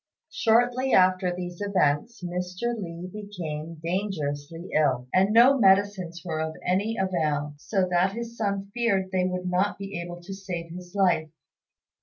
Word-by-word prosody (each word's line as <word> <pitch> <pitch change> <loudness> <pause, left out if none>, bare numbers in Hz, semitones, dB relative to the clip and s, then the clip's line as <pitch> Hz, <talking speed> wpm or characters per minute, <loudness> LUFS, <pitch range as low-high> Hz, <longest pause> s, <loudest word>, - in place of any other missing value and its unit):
Shortly 245 +3 +2
after 185 0 +4
these 175 +1 -6
events 190 +1 +1
Mr. 180 +6 -2
Li 175 -4 -6
became 170 -7 -6
dangerously 165 -3 -3
ill, 130 -5 +2
and 190 +2 +4
no 250 +5 +6
medicines 190 -4 +3
were 155 -3 -2
of 160 0 -3
any 200 +5 +1
avail, 155 -6 0
so 190 +2 0
that 180 +2 +2
his 235 +1 -6
son 200 -3 -2
feared 200 -6 +1
they 185 -1 +1
would 180 0 -2
not 185 +3 +1
be 195 -3 -5
able 175 0 -7
to 195 +2 -7
save 180 -4 -6
his 180 +2 -10
life. 175 -5 +2
185 Hz, 150 wpm, -26 LUFS, 170-200 Hz, -, no